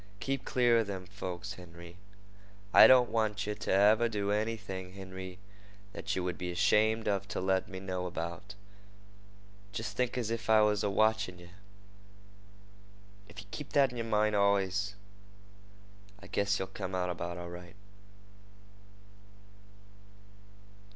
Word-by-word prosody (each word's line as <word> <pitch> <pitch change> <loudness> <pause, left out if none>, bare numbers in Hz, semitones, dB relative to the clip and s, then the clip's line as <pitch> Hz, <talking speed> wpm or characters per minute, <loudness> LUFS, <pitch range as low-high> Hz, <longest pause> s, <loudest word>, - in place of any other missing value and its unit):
Keep 135 +2 -3
clear 120 -2 +3
of 110 - -1
them 95 -2 -5
folks, 95 +1 -6
Henry. 85 -2 -12 0.8
I - - +10
don't 125 -2 +6
want 105 -3 0
yeh 105 - -2
to 105 - -4
ever 105 +4 +5
do 100 -2 -1
anything, 105 -4 -3
Henry, 95 -1 -8 0.6
that - - -3
yeh 95 - -1
would 90 -1 -3
be 90 -1 -3
'shamed 110 +4 +3 0.2
to - - -3
let 95 +2 +1
me 95 -3 -7
know 90 -1 -3
about. 85 +3 -6 1.2
Jest 105 0 -5
think 125 +2 -1
as 115 -3 -2
if 115 -1 -4
I 110 -1 +6
was 105 -1 +2
a 105 - +1
watchin' 110 -3 +1
yeh. 85 0 -14 1.8
If 110 +2 -9
yeh - - -22
keep 150 - -7
that 135 -2 +4
in 125 - -8
yer 115 - -2
mind 105 -1 +1
allus, 100 0 +1 1.2
I 100 - -14
guess 100 0 0
yeh'll 95 0 -5
come 95 -2 -4
out 90 -1 -1
about 85 0 -5
right. 85 +1 -10
100 Hz, 140 wpm, -31 LUFS, 95-110 Hz, 1.8 s, I